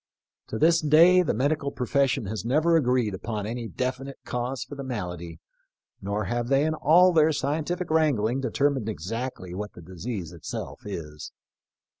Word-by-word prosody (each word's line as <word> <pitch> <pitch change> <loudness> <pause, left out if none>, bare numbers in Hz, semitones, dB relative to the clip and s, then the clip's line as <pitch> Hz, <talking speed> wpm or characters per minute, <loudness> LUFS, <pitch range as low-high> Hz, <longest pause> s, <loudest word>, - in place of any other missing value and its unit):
To 110 - -4
this 165 +5 +4
day 165 +4 +6
the 170 - 0
medical 140 +3 0
profes 140 +2 +1
sion 115 - -1
has 100 -1 -4
never 155 +7 +2
agreed 125 -7 +2
upon 105 +2 -4
any 115 +1 -4
definite 130 +3 -4
cause 125 +1 -3
for 125 - -11
the 140 -1 -6
malady, 90 -9 -5 0.6
nor 100 +2 -2
have 120 +3 -2
they 135 +3 +3
in 155 - +1
all 170 +4 +5
their 160 -1 +5
scientific 155 +5 -2
wrangling 135 -6 +2
determined 135 -2 0
exactly 105 - -5
what 105 +3 -5
the - - -12
disease 90 0 -6
it 85 -2 -14
self - - -6
is. 75 -6 -7
125 Hz, 165 wpm, -26 LUFS, 105-150 Hz, 0.6 s, day